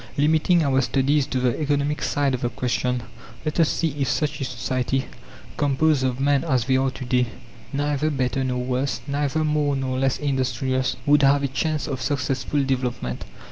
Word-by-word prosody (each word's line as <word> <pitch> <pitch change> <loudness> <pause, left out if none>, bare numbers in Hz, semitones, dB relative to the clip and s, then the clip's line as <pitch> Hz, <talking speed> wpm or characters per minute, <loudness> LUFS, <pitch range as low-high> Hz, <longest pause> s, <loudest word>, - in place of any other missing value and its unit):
Limiting 160 +4 +3
our 135 -2 +3
studies 135 +3 +1
to 130 - -1
the 125 +4 0
economic 145 0 0
side 140 -2 +1
of 130 - -2
the 120 - 0
question, 125 0 -1 0.4
let 155 +2 -2
us 165 - +5
see 165 - 0
if 135 - +1
such 145 -2 -1
a - - 0
society, 130 +1 -1 0.5
composed 145 0 +2
of 130 -1 -1
men 140 0 +2
as 130 -8 +1
they 130 0 +2
are 135 +1 +2
to 130 0 -7
day, 125 -1 +2 0.4
neither 145 +1 0
better 135 -2 -1
nor 125 -1 -1
worse, 125 -1 -1
neither 145 +2 0
more 150 -2 +1
nor 130 -1 -2
less 135 -1 +1
industrious, 130 -2 0
would 145 0 +5
have 140 0 +4
a - - +2
chance 150 +3 -1
of 130 -3 -3
successful 140 +1 -1
development. 125 - -2
135 Hz, 180 wpm, -23 LUFS, 130-145 Hz, 0.5 s, us